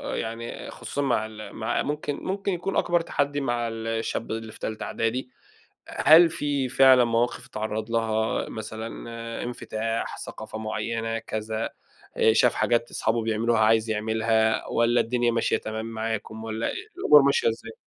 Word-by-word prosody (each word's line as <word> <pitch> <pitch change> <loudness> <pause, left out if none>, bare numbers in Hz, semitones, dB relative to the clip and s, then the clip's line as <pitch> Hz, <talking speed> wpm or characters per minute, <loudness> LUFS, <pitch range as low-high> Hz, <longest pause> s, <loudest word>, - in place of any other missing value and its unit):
يعني 115 +1 -5
خصوصًا 145 - -4
مع 125 -6 +1
ال 110 -1 -9
مع 110 - -1
ممكن 150 0 -2
ممكن 195 +5 -3
يكون 180 +3 -3
أكبر 175 -1 +2
تَحدِّي 145 -3 -1
مع 120 -2 -1
الشاب 115 0 -3
اللي 110 0 -4
في - - -14
تالتة 110 0 -4
أعدادي، 125 +3 -2 0.6
هل 165 +2 +6
في 145 -5 -1
فعلًا 130 -1 +6
مواقف 120 +1 0
اتعرّض 110 +1 -4
لها، 110 -1 0
مثلًا 110 +1 -6 0.6
انفتاح، 115 -2 -3
ثقافة 110 0 -7
مُعيَّنة 115 +1 -2
كذا، 110 0 -3 0.5
آآ 110 - +5
شاف 120 +1 +4
حاجات 120 0 +1
أصحابُه 115 0 0
بيعملوها 115 +1 +1
عايز 110 +1 +3
يعملها، 110 +1 +1
والّا 120 +1 +2
الدنيا 120 0 +1
ماشية 115 0 +1
تمام 110 +1 -5
معاكُم 110 -1 -4
والّا 110 +1 -2 0.3
الأمور 150 - +7
ماشية 140 -4 +3
إزَّاي؟ 115 0 -4
115 Hz, 145 wpm, -26 LUFS, 110-125 Hz, 0.6 s, الأمور